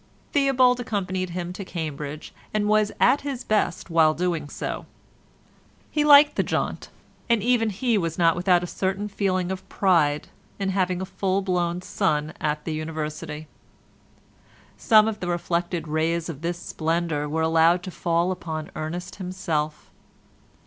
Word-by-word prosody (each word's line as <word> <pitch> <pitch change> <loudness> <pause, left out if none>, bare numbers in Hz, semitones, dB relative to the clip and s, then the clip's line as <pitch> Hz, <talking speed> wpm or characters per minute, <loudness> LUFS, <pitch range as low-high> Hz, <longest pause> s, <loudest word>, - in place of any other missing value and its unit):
Theobald 260 -4 +4
accompanied 190 -5 -2
him 175 0 -4
to 195 - -6
Cambridge, 155 -4 -6 0.2
and 210 -1 +1
was 215 0 +3
at 285 - +4
his 275 -3 -4
best 195 -5 0
while 160 -2 +4
doing 170 -4 -1
so. - - -5 1.0
He 300 - +1
liked 295 0 +7
the - - +4
jaunt, - - -2 0.4
and 230 -4 +3
even 235 -2 +2
he 225 +2 +1
was 165 -3 -2
not 165 -2 +4
without 180 0 +3
a - - -1
certain 195 +3 -2
feeling 190 -3 -1
of 190 0 -6
pride 160 -6 +2 0.3
in 195 -1 -1
having 185 -1 0
a - - -3
full 195 +1 -1
blown 180 -1 -1
son 155 -7 0
at 150 0 -1
the 160 - -2
University. 155 0 -5 1.3
Some 215 -1 +5
of 215 -1 -3
the 180 - -4
reflected 175 -1 -1
rays 160 +2 0
of 150 -3 -7
this 170 +1 -2
splendour 160 -3 -2
were 160 +2 0
allowed 165 +2 +4
to 185 - -6
fall 170 +1 0
upon 160 -4 -5
Ernest 175 +4 -5
himself. 180 -5 -3
175 Hz, 150 wpm, -24 LUFS, 160-195 Hz, 1.3 s, liked